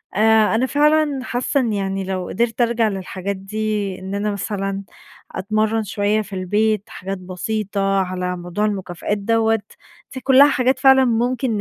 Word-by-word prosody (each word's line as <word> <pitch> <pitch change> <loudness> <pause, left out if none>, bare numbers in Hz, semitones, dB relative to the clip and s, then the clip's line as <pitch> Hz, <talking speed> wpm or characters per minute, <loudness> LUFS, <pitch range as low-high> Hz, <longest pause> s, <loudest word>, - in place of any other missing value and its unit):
آآ 220 0 +4
أنا 240 +3 +2
فعلًا 295 0 +2
حاسّة 255 +3 -1
إن 230 -4 0
يعني 195 -1 -2
لو 185 -1 -3
قدِرت 230 +2 -1
أرجَع 235 -1 +2
للحاجات 195 0 -4
دي، 205 -1 -3
إن 190 +1 -5
أنا 210 +1 -1
مثلًا 195 -1 -3 0.5
أتمرّن 215 +3 0
شويّة 205 +2 0
في 195 -1 -10
البيت، 210 +3 0
حاجات 195 +1 -5
بسيطة 195 +1 -2
على 180 -1 -3
موضوع 175 +4 -2
المكافآت 195 -1 -3
دوّة، 225 +1 +1 0.5
دي 260 - -5
كُلّها 270 +2 +6
حاجات 255 +1 +1
فعلًا 265 -1 +6
ممكن 245 +2 0
210 Hz, 150 wpm, -20 LUFS, 195-230 Hz, 0.5 s, كُلّها